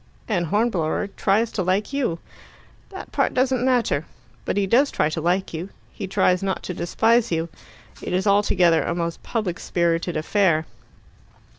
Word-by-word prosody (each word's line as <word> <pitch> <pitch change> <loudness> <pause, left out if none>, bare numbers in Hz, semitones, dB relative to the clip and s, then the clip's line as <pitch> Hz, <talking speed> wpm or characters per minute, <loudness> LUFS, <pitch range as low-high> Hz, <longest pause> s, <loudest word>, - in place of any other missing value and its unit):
"And 175 -6 0
Hornblower 205 -4 0
tries 215 +4 +1
to 195 - -2
like 190 +7 0
you." 255 -12 0 0.7
"That 385 -1 -9
part - - 0
doesn't 255 -1 +1
matter." 240 - +1 0.4
"But - - -1
he 200 - +2
does 255 +8 +3
try 155 - 0
to 160 - -3
like 180 +3 0
you. 170 +4 -5 0.2
He 200 - -6
tries 185 -1 +2
not 195 -1 -2
to 180 - -4
despise 225 +7 +1
you. 165 0 -1 0.5
It - - -5
is 185 +2 0
altogether 200 -5 +3
a 170 - -2
most 170 -1 -3
public 210 -7 -3
spirited 170 0 0
affair." 160 -1 +2
190 Hz, 160 wpm, -23 LUFS, 170-220 Hz, 0.7 s, does